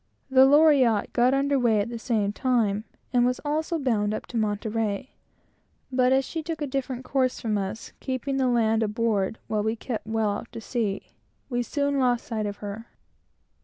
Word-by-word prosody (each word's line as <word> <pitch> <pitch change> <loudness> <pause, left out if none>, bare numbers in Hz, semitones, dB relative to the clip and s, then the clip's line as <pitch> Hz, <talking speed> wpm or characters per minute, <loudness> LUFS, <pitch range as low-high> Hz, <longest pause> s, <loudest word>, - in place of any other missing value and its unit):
The 265 0 +7
Loriotte 280 -7 +4
got 250 +2 +3
under 280 0 +2
weigh 230 -4 +3
at 205 - -1
the 235 -1 -5
same 215 -4 0
time, 220 -4 +1 0.3
and 245 -1 +4
was 250 0 +1
also 315 +3 -1
bound 215 -7 0
up - - -6
to - - -9
Monterey, 215 +1 -1 0.8
but 255 0 +3
as 265 0 +3
she 325 - -4
took 320 0 -5
a 295 - -1
different 260 -2 -3
course 260 -2 0
from 220 -2 -1
us, 205 +3 -4
keeping 270 +1 -2
the 260 -1 +2
land 225 -2 +2
aboard, 215 -2 0
while 215 -1 -1
we 220 +2 0
kept 225 -1 -5
well 220 -1 +1
out 205 +3 -6
to 230 - -5
sea, 220 -4 -3 0.4
we 245 0 +1
soon 280 +3 0
lost 245 -2 +1
sight 215 -3 -2
of 205 0 -5
her. 210 +3 -6
235 Hz, 185 wpm, -26 LUFS, 215-265 Hz, 0.8 s, The